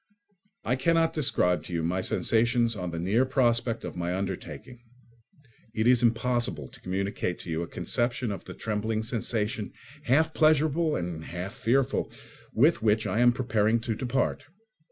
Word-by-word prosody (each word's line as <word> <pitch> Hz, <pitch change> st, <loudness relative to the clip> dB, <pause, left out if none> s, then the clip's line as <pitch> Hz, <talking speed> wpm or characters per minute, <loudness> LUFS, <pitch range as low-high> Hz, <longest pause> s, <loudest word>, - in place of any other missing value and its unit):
I 125 Hz, -, +1 dB
cannot 165 Hz, +3 st, +2 dB
describe 90 Hz, -, +2 dB
to 90 Hz, -, -7 dB
you 85 Hz, -1 st, -1 dB
my 90 Hz, +3 st, 0 dB
sensations 115 Hz, +3 st, +2 dB
on 90 Hz, -3 st, -4 dB
the 85 Hz, -, -5 dB
near 100 Hz, +9 st, +2 dB
prospect 120 Hz, -3 st, +1 dB
of -, -, -6 dB
my 90 Hz, 0 st, -2 dB
undertaking. 100 Hz, +6 st, -6 dB, 0.9 s
It 110 Hz, -, 0 dB
is 125 Hz, -1 st, +5 dB
impossible 115 Hz, -, 0 dB
to -, -, -16 dB
communicate 95 Hz, -1 st, -2 dB
to 85 Hz, -, -7 dB
you 80 Hz, +1 st, -1 dB
a 85 Hz, -, -4 dB
conception 120 Hz, +3 st, -1 dB
of 100 Hz, -, -6 dB
the -, -, -9 dB
trembling 110 Hz, 0 st, -2 dB
sensation, 110 Hz, -2 st, -2 dB, 0.3 s
half 160 Hz, +4 st, +3 dB
pleasurable 155 Hz, 0 st, +3 dB
and 85 Hz, -2 st, -4 dB
half 90 Hz, +3 st, -6 dB
fearful, 130 Hz, +3 st, 0 dB, 0.4 s
with 150 Hz, +9 st, +3 dB
which 110 Hz, 0 st, +2 dB
I 110 Hz, -, -1 dB
am 120 Hz, 0 st, +6 dB
preparing 115 Hz, -3 st, +1 dB
to 115 Hz, 0 st, -2 dB
depart. 130 Hz, +4 st, -1 dB
115 Hz, 155 wpm, -27 LUFS, 95-125 Hz, 0.9 s, am